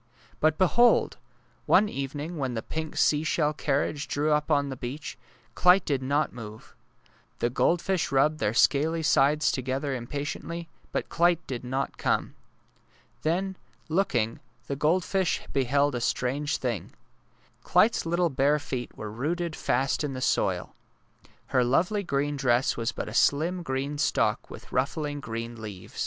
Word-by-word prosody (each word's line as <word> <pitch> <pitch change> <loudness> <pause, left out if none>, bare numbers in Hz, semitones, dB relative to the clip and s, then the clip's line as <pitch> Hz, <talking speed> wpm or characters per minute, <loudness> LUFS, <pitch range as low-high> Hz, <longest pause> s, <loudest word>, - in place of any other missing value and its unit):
But 155 0 +3
behold! 235 +6 +4 0.5
one 210 - +5
evening 145 +1 -5
when 130 -3 -2
the 110 - -3
pink 160 -1 -5
sea 150 0 +3
shell 155 -1 +1
carriage 145 0 -1
drew 150 +2 0
up 150 +1 +1
on 145 -2 +2
the 135 - -4
beach, 135 +5 -6 0.4
Clyte 180 +2 +5
did 140 -3 0
not 145 +3 0
move. 110 -2 -10 0.6
The 120 - 0
goldfish 175 +6 +1
rubbed 150 +3 +3
their 105 -3 0
scaly 155 +6 +3
sides 150 +1 +3
together 135 +2 -2
impatiently, 145 +6 -5 0.2
but - - -2
Clyte 175 0 +2
did 125 -2 -5
not 130 +2 -3
come. - - 0 0.9
Then, 185 +4 -1 0.3
looking, 125 - 0 0.3
the 140 - -3
goldfish 175 +5 +1
beheld 140 +2 +2
a 125 - -2
strange 140 +5 0
thing. 120 -8 -3 0.7
Clyte 230 - +4
's - - -2
little 170 0 +1
bare 140 +3 +3
feet 130 -4 -5
were 105 -1 -6
rooted 160 +8 -2
fast 135 +4 0
in 145 -2 -2
the 130 - -5
soil. - - 0 0.8
Her 125 - +4
lovely 175 - +2
green 145 -5 -1
dress 125 -1 +2
was 115 -1 -1
but - - -5
a 105 - -6
slim 165 +9 +2
green 140 -1 -3
stalk - - +1
with - - -11
ruffling 145 +3 -1
green 115 -2 -6
leaves. 100 -4 -9
145 Hz, 150 wpm, -27 LUFS, 130-160 Hz, 0.9 s, one